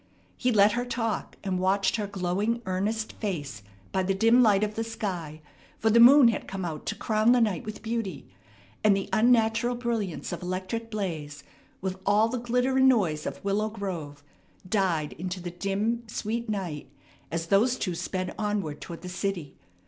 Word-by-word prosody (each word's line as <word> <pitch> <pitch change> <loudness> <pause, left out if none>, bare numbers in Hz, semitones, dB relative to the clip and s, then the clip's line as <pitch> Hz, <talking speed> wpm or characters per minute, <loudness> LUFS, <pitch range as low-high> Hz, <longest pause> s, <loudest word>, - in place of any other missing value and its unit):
He 250 - +1
let 210 -1 +5
her 245 +3 -1
talk, 230 -2 -3
and 190 -2 -1
watched 195 +3 +2
her 210 -2 -2
glowing, 200 +5 -1
earnest 205 +4 -2
face 145 - -4 0.3
by 190 - +1
the 190 +1 0
dim 230 +5 +5
light 210 -4 +4
of 210 0 -1
the 225 - -2
sky; 180 -9 -5 0.4
for 220 - +2
the 235 - +5
moon 250 +1 +9
had 225 - -3
come 190 -1 -4
out 155 -3 -6
to - - -1
crown 220 +2 +3
the 250 - +4
night 210 -7 +1
with 215 0 -7
beauty, 220 -8 -3 0.6
and 205 -2 +5
the 195 - -4
unnatural 230 +1 +3
brilliance 230 -7 -3
of - - -5
electric 185 +6 -4
blaze, 155 -9 -4 0.4
with 190 0 -3
all 210 +3 +3
the 250 - -2
glitter 250 +2 +1
and 265 0 +6
noise 170 -11 +1
of - - -7
Willow 210 +2 +1
Grove, 170 -9 -6 0.4
died 180 -7 0
into 185 +1 -4
the 175 0 -6
dim, 200 +6 -1
sweet 220 +2 -3
night 175 -10 -4 0.4
as 165 0 -2
those 220 +8 +3
two 185 -7 -2
sped 185 +2 -3
onward 205 -8 -2
toward 170 0 -8
the - - -6
city. 180 -5 -3
200 Hz, 180 wpm, -27 LUFS, 180-225 Hz, 0.6 s, moon